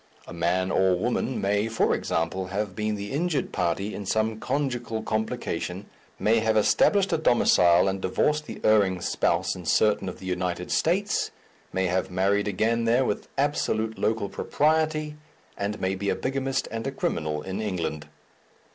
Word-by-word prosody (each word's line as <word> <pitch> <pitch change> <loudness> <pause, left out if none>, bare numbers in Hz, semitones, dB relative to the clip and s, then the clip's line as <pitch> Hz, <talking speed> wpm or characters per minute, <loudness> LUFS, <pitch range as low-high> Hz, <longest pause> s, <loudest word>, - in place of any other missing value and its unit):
A - - -10
man 90 +2 0
or 95 -1 +3
woman 120 +5 -1
may, 100 +2 +1
for 115 0 +1
example, 85 +3 -1
have 100 0 -3
been 105 0 -1
the 100 0 -6
injured 155 +2 -1
party 90 +4 -1
in 100 - -6
some 110 +1 0
conjugal 120 -4 -2
complication, 110 -4 -3 0.3
may 115 +2 +3
have 110 0 +1
established 195 - +3
a - - +2
domicile 90 - +4
and 95 0 -1
divorced 150 +11 0
the - - -7
erring 100 -4 +3
spouse - - 0
in 90 - -8
certain 100 +2 +2
of - - -8
the - - -11
United 90 -1 -2
States, 195 +5 +1 0.4
may 95 0 0
have 90 +1 0
married 100 +3 +1
again 115 +4 +1
there 120 +3 +3
with - - -2
absolute 110 -6 0
local 110 -2 0
propriety, 155 +4 0 0.4
and 105 +1 -3
may 95 +1 0
be 100 +1 -2
a - - +1
bigamist 135 0 -2
and 115 +3 -3
a - - -1
criminal 75 - -2
in 95 +3 -4
England. 85 -7 -3
105 Hz, 165 wpm, -26 LUFS, 95-120 Hz, 0.4 s, domicile